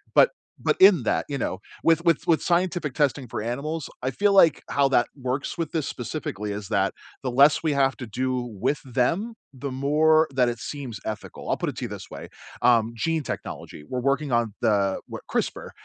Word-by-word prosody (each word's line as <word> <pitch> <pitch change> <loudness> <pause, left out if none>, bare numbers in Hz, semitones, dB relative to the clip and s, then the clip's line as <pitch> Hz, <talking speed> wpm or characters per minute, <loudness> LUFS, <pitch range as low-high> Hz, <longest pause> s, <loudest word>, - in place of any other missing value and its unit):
But - - +6 0.3
but - - +1
in 185 - +7
that, - - 0
you 140 - -2
know, 95 -6 -3 0.2
with 165 0 +3
with 170 -2 +2
with 165 -2 +3
scientific 175 -5 0
testing 140 -3 +1
for 110 - -4
animals, 140 +6 -3
I 130 - -1
feel 200 +8 +2
like 170 -6 +5
how 140 -1 +3
that 120 -3 +4
works 130 0 -3
with 165 -3 -3
this 160 -4 -1
specifically 115 -5 -4
is 100 -1 -5
that 95 -1 +1 0.3
the 130 - -2
less 140 +4 +5
we 155 -2 +1
have 135 -1 +2
to 125 - -7
do 130 +3 -1 0.2
with 135 +6 0
them, 165 - 0 0.2
the 135 +2 -5
more 155 +4 +3
that 125 -2 +3
it 120 - -4
seems 125 -2 -6
ethical. 110 -1 -6
I'll - - +1
put - - -2
it - - -7
to - - -3
you - - -5
this - - -8
way, - - -9 0.3
um, 115 -2 +4
gene 165 +6 0
technology, 75 - -7
we're 125 - -3
working 140 +1 0
on 120 -3 +1
the 100 -2 +2
wh - - -4
CRISPR, - - -2
135 Hz, 205 wpm, -25 LUFS, 120-155 Hz, 0.3 s, in